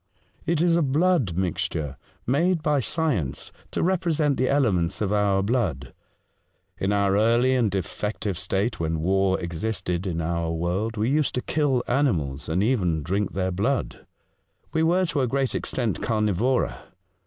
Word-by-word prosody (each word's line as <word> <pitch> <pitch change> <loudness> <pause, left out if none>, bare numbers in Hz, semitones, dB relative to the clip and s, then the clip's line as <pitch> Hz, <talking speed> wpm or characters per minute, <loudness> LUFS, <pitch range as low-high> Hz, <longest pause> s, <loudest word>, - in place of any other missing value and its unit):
"It 165 -1 +2
is 170 -1 +4
a 170 - +3
blood 145 - +2
mixture, 80 -5 -2 0.3
made 165 +6 +1
by 150 -2 +2
science 125 - -1 0.2
to - - -2
represent 165 -5 +1
the 130 - +1
elements 100 -11 +1
of 105 -1 0
our 100 -2 +2
blood. 95 - -1 0.9
In 95 - 0
our 100 -1 +2
early 120 +5 +3
and 120 -4 +2
defective 100 +1 -3
state, 95 +6 -2
when 80 -1 -1
war 95 +1 +2
existed 90 +1 -3
in 85 -2 -2
our 85 0 -1
world, 90 +7 -2
we 110 +5 +1
used 150 0 +1
to 125 - 0
kill 140 -5 +1
animals, 80 - 0
and 90 +5 +1
even 90 - +1
drink 95 +4 -1
their 95 0 -1
blood. 115 +9 -2 0.7
We 160 - +2
were 175 +3 +3
to 155 -5 -1
a 130 - +1
great 135 +1 0
extent 115 -9 -2
carnivora. 110 +3 0
105 Hz, 155 wpm, -25 LUFS, 90-135 Hz, 0.9 s, is